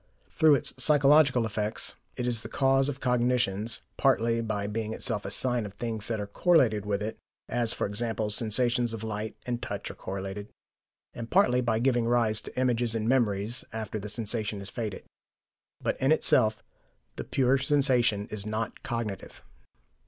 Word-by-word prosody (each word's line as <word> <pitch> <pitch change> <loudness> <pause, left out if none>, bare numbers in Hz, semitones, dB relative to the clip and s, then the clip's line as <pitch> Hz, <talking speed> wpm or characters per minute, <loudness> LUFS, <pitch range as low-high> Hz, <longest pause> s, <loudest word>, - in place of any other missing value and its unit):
Through 155 -2 +5
its 135 - -1
psychological 145 -4 +5
effects, 105 0 -2 0.2
it 125 - -2
is 120 -2 0
the 110 - -8
cause 135 +1 +2
of 140 -1 -5
cognitions, 120 -4 0 0.2
partly 115 0 +2
by 105 -3 -3
being 110 +1 -3
itself 110 -5 -1
a - - -3
sign 120 +3 +1
of 100 -1 -8
things 110 -1 -3
that 115 -2 -2
are 105 - -3
correlated 110 - +2
with 100 0 -1
it, 110 - -5 0.3
as 120 -2 +1
e.g. 100 - -2 0.4
sensations 120 +2 +3
of 110 - -8
sight 110 0 -5
and 120 -1 -3
touch - - -5
are - - -10
correlated, 95 +2 -6 0.6
and 115 -1 -7
partly 125 -10 +3
by 115 -3 0
giving 120 0 +1
rise 115 -3 +2
to - - -7
images 120 -2 +1
and 110 0 -2
memories 115 -2 0
after 110 -1 -5
the 105 +1 -7
sensation 110 -1 -2
is 100 0 -8
faded. 110 -5 -5 0.8
But - - -3
in 135 +3 +3
itself 110 -8 +3 0.5
the - - -5
pure 135 0 +1
sensation 125 -7 +2
is 105 -2 -2
not 110 +1 -4
cognitive. 115 -5 -5
115 Hz, 165 wpm, -28 LUFS, 105-125 Hz, 0.8 s, Through